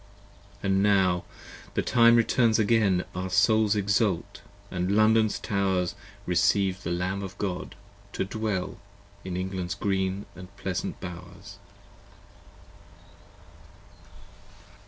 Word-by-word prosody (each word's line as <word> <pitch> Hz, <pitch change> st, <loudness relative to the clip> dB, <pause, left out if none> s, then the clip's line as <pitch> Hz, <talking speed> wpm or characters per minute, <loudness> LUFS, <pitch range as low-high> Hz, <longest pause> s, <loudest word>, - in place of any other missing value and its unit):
85 -, -, -7 dB
And 95 Hz, 0 st, +2 dB
now 95 Hz, -3 st, +3 dB, 0.5 s
the -, -, +1 dB
time 115 Hz, -1 st, +5 dB
returns 115 Hz, -1 st, +3 dB
again: 105 Hz, -4 st, +2 dB
Our 95 Hz, +1 st, -4 dB
souls 105 Hz, +3 st, +3 dB
exult, 100 Hz, -1 st, 0 dB, 0.3 s
& -, -, -25 dB
London's 110 Hz, +4 st, +2 dB
towers 95 Hz, -3 st, 0 dB, 0.3 s
Recieve 95 Hz, +2 st, +2 dB
the 85 Hz, -, -4 dB
Lamb 90 Hz, +3 st, -2 dB
of 95 Hz, 0 st, -7 dB
God 95 Hz, -3 st, -4 dB, 0.4 s
to -, -, -1 dB
dwell 105 Hz, -2 st, -3 dB, 0.5 s
88 -, -, -5 dB
In 90 Hz, -, -3 dB
England's 90 Hz, -1 st, -3 dB
green 95 Hz, 0 st, -1 dB, 0.2 s
& 100 Hz, +2 st, -15 dB
pleasant 95 Hz, -2 st, -4 dB
bowers. 90 Hz, +3 st, -10 dB
95 Hz, 110 wpm, -27 LUFS, 90-105 Hz, 0.5 s, time